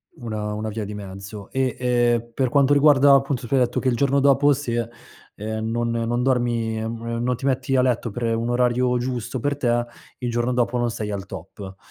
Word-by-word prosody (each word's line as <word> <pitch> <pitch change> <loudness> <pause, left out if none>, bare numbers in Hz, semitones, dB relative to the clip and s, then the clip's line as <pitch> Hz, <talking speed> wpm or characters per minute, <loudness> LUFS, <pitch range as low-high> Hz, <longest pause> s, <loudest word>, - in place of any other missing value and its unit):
Una 105 -3 -4
una 110 +1 -3
via 110 +1 -4
di 105 - -6
mezzo. 100 +1 -9
E, 130 -1 0
ehm, 120 -1 +1
per 130 0 0
quanto 140 0 +4
riguarda, 140 -1 +6
appunto 135 -2 +1
tu 135 - -4
hai 135 - +4
detto 125 -1 +1
che 130 - -2
il 120 - +1
giorno 140 +1 +2
dopo 140 +1 +4
se, 120 -4 -2 0.5
ehm, 110 +1 -4
non 120 0 -1
non 115 +1 -1
dormi, 120 -4 0
non 115 +2 -2
ti 135 - -7
metti 135 0 0
a 130 - +4
letto 120 -2 0
per 115 +1 -1
un 115 +1 -2
orario 125 0 +2
giusto, 125 0 -3
per 145 +3 -1
te 120 -3 +1 0.3
il 120 -2 -2
giorno 120 +1 0
dopo 125 0 +1
non 120 - +1
sei 110 -2 -4
al 100 -1 -4
top. 95 +1 -9
120 Hz, 205 wpm, -23 LUFS, 115-130 Hz, 0.5 s, riguarda